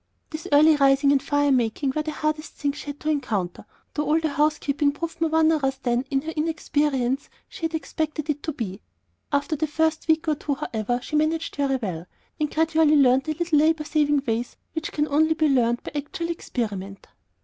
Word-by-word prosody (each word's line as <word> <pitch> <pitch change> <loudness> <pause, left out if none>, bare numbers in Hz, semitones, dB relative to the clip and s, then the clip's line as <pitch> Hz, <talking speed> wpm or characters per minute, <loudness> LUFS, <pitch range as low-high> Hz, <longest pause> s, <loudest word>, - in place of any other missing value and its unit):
This 310 0 -6
early 305 +2 +6
rising 275 0 +4
and 280 -1 +3
fire 290 0 +1
making 255 +2 +1
were 305 - +1
the 305 - -4
hardest 305 0 -2
things 285 -1 -2
she - - -9
had 285 0 -6
to 310 - -2
encounter, 220 -11 -2 0.3
though 300 - -1
all 310 +2 +3
the 320 -1 -1
housekeeping 295 0 +1
proved 330 +2 -6
more 320 -1 +1
onerous 315 -4 +3
than, 245 -1 -1
in 270 -1 +1
her 320 - -4
inexperience, 295 -4 0 0.2
she 330 - -6
had 325 0 -2
expected 305 0 -3
it 295 -1 -2
to 315 - -3
be. 215 -8 -5 0.5
After 285 +2 0
the 310 +1 -1
first 320 +1 0
week 320 0 +2
or 310 - +3
two, 285 -1 -2
however, 235 -1 -2
she - - -4
managed 315 +2 0
very 275 -2 +1
well, 180 -9 -4 0.3
and 300 -1 0
gradually 320 -1 +3
learned 265 -2 +4
the 310 0 -2
little 335 -2 +2
labor 315 +1 +3
saving 295 -2 +1
ways 230 +1 -2 0.2
which 320 +1 -4
can 295 0 0
only 315 +2 +3
be 315 -1 +2
learned 240 -4 +2
by - - -6
actual 300 +3 -4
experiment. 205 - -4
295 Hz, 200 wpm, -24 LUFS, 270-315 Hz, 0.5 s, early